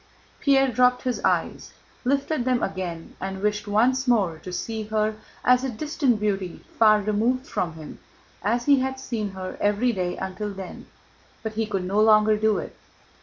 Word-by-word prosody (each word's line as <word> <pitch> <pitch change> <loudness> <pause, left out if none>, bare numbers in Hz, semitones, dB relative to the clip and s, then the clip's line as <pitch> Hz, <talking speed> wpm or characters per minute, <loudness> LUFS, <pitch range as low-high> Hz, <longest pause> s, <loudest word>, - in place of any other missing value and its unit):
Pierre 270 -2 +3
dropped 250 +1 +3
his 250 -2 -1
eyes, - - -1 0.3
lifted 280 +1 0
them 250 -1 +1
again, 175 -4 -4
and 190 0 -4
wished 210 +1 -1
once 255 +6 +2
more 195 -10 +2
to 180 - -8
see 220 +4 -3
her 215 0 0 0.3
as 250 0 +5
a 265 - -1
distant 260 -1 0
beauty 195 -4 -2
far 215 -2 +6
removed 225 +6 0
from 170 -10 -2
him, 155 -1 -10 0.4
as 235 +4 0
he 280 -2 +5
had 265 0 -2
seen 225 -6 -3
her 185 -1 -7
every 210 +4 +2
day 180 -4 -2
until 190 +2 -4
then, 190 -1 -8 0.6
but 220 -1 -4
he 220 0 -1
could 195 -3 -2
no 200 +3 +1
longer 215 0 +5
do 215 0 +2
it. - - -6
215 Hz, 170 wpm, -25 LUFS, 195-250 Hz, 0.6 s, far